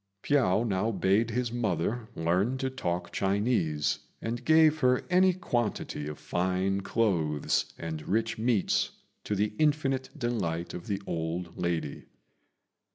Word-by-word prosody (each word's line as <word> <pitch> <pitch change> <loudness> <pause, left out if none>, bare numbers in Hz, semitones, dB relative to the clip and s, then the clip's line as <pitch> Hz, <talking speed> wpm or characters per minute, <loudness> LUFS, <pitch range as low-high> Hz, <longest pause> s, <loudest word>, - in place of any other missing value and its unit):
Piao 120 -8 +3
now 100 +2 +1
bade 100 +2 +2
his 120 +1 -1
mother 110 0 -1
learn 90 +10 +1
to 130 0 -2
talk 90 -9 -3
Chinese, 95 - +1 0.2
and 115 +1 -4
gave 155 -1 +5
her 125 -2 +3
any 185 +1 +6
quantity 120 - -2
of 75 -1 -6
fine 95 +2 0
clothes 85 -9 0
and 80 -2 -5
rich 115 +2 0
meats, 110 -3 +2 0.4
to 105 - -1
the 105 +1 0
infinite 140 -3 +1
delight 95 - -2
of 85 - -7
the 100 -2 -1
old 85 +1 -3
lady. 85 -4 -2
105 Hz, 130 wpm, -29 LUFS, 85-125 Hz, 0.4 s, any